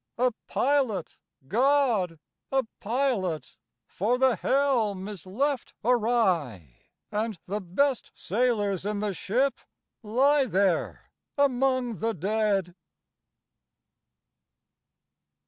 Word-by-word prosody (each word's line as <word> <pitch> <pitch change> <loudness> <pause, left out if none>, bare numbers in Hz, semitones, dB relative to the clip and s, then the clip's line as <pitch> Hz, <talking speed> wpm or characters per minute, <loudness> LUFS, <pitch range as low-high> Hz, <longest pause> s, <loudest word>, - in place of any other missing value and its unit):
A 250 +1 +3 0.2
pilot, 260 - 0 0.3
GOD, 235 - +2 0.3
a 270 -1 +2 0.2
pilot! 215 - -1 0.3
for 220 - 0
the 260 -2 +3
helm 235 -9 +1
is 200 -4 -8
left 270 +7 -1
awry, 185 - +1 0.3
And 215 -1 -2
the 205 +3 -3
best 250 +9 0
sailors 205 -3 0
in 210 +1 -2
the 205 -1 -1
ship 255 +10 0 0.4
lie 265 +6 +3
there 190 -5 0 0.3
among 255 -4 +1
the 225 0 -1
dead!" 195 0 0
220 Hz, 90 wpm, -27 LUFS, 195-260 Hz, 0.4 s, A